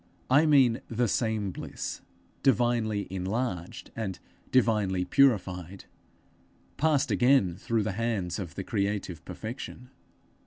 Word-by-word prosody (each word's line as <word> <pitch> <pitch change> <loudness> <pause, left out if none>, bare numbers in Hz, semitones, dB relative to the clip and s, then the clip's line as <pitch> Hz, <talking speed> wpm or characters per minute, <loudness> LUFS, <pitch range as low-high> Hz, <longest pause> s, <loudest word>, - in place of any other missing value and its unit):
_ - - -34 0.3
I 145 +4 +6
mean 130 -6 +5
the 120 +1 0
same 110 -2 0
bliss, - - -6 0.4
divinely 120 -5 +2
enlarged 95 -1 -3
and 105 -5 -3 0.3
divinely 105 -7 +2
purified 95 - +1 0.9
passed 145 -4 +2
again 105 -4 +4
through 110 +3 -1
the 105 - -1
hands 105 -3 -2
of 85 -4 -6
the 95 - -4
creative 100 -5 -2
Perfection. 125 +2 -7
110 Hz, 115 wpm, -28 LUFS, 95-125 Hz, 0.9 s, I